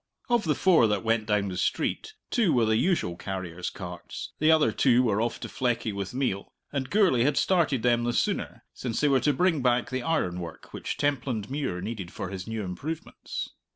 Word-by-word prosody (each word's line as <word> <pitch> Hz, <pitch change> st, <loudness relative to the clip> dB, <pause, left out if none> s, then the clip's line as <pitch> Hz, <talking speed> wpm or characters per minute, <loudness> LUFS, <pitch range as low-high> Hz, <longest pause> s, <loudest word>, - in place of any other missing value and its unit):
Of 240 Hz, -4 st, +2 dB
the 150 Hz, -2 st, +2 dB
four 170 Hz, -11 st, +5 dB
that 105 Hz, -1 st, 0 dB
went 115 Hz, -1 st, +1 dB
down 105 Hz, -2 st, +1 dB
the 90 Hz, -, -5 dB
street 435 Hz, -, -1 dB, 0.2 s
two 225 Hz, -8 st, +3 dB
were 120 Hz, -3 st, +3 dB
the 110 Hz, 0 st, +2 dB
usual 135 Hz, -, +1 dB
carriers' 90 Hz, -2 st, -4 dB
carts, 90 Hz, -3 st, -7 dB
the 155 Hz, -, +4 dB
other 160 Hz, -1 st, +5 dB
two 125 Hz, -2 st, +4 dB
were 110 Hz, -3 st, +1 dB
off 120 Hz, 0 st, -1 dB
to -, -, -4 dB
Fleckie 120 Hz, -4 st, -1 dB
with 100 Hz, -1 st, -4 dB
meal, 125 Hz, -7 st, -2 dB, 0.2 s
and 135 Hz, -3 st, -2 dB
Gourlay 185 Hz, -, +4 dB
had 140 Hz, +3 st, +2 dB
started 155 Hz, -10 st, +2 dB
them 120 Hz, -1 st, +3 dB
the 120 Hz, -, +1 dB
sooner -, -, -1 dB
since 120 Hz, -3 st, -3 dB
they 150 Hz, -, +3 dB
were 135 Hz, -2 st, +4 dB
to 150 Hz, -, +2 dB
bring 165 Hz, +1 st, +2 dB
back 125 Hz, +2 st, +2 dB
the 130 Hz, 0 st, -1 dB
ironwork 90 Hz, -, -2 dB
which -, -, -4 dB
Templandmuir 130 Hz, -6 st, -1 dB
needed 100 Hz, -5 st, -5 dB
for 95 Hz, -, -5 dB
his 95 Hz, 0 st, -6 dB
new 110 Hz, -1 st, -3 dB
improvements. 150 Hz, -, -5 dB
120 Hz, 195 wpm, -27 LUFS, 100-145 Hz, 0.2 s, four